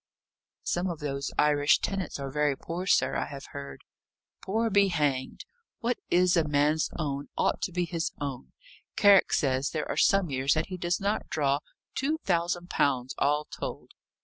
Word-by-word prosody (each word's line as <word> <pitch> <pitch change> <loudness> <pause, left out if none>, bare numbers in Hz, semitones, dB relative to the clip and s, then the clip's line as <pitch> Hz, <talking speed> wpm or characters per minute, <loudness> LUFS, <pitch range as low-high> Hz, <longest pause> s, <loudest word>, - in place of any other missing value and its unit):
"Some 180 +2 -1
of 170 - -4
those 140 -2 -3
Irish 145 -1 +4
tenants 190 -7 -3
are 135 -1 -4
very 150 -1 +1
poor, 175 +3 -5
sir, - - +3
I - - 0
have 140 -1 -8
heard." 140 -2 -8 0.6
"Poor 225 +3 0
be 200 0 +5
hanged! 145 -7 -1 0.3
What 245 -1 -1
is 180 0 +4
a 165 - +4
man's 150 +1 +2
own, 145 -3 -3
ought - - +1
to - - -2
be 180 0 0
his 165 -1 -2
own. 135 -3 -5 0.4
Carrick 200 -2 +6
says 135 0 +1
there 155 - -3
are - - -3
some 195 -5 +3
years 135 +2 +2
that 155 +3 -1
he 185 - -5
does 175 +1 -1
not 200 +2 -1
draw 140 -2 +1 0.3
two 300 +4 0
thousand 175 0 0
pounds, 130 -2 +1
all 150 +1 +2
told." - - -7
155 Hz, 175 wpm, -28 LUFS, 140-180 Hz, 0.6 s, Carrick